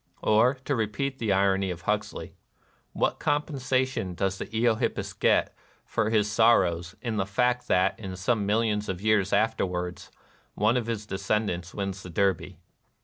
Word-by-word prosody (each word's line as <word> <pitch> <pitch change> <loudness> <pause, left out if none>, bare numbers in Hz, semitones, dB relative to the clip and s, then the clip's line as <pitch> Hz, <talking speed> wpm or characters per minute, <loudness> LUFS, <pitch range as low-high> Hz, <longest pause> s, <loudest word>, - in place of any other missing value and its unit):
Or, 110 +5 +4
to 140 - 0
repeat 130 +5 -2
the 110 -3 0
irony 95 0 +2
of 85 -1 -6
Huxley, 105 0 -2 0.6
"what - - 0
compensation 130 - -1
does 95 +1 -1
the - - -4
Eohippus 115 +1 0
get - - +2 0.3
for 110 -1 0
his 105 -2 +2
sorrows 95 -6 +3
in 115 -3 -2
the 95 - +1
fact 125 +4 +1
that, 95 +1 +2 0.2
some 100 +2 0
millions 105 -1 +1
of 95 -2 -3
years 105 -2 +2
afterwards, 90 -5 -1 0.5
one 110 +3 +2
of 120 -2 -1
his 110 -2 -3
descendants 95 -3 -2
wins 95 -1 -3
the 90 - -9
Derby 95 -1 0
105 Hz, 145 wpm, -27 LUFS, 95-115 Hz, 0.6 s, Or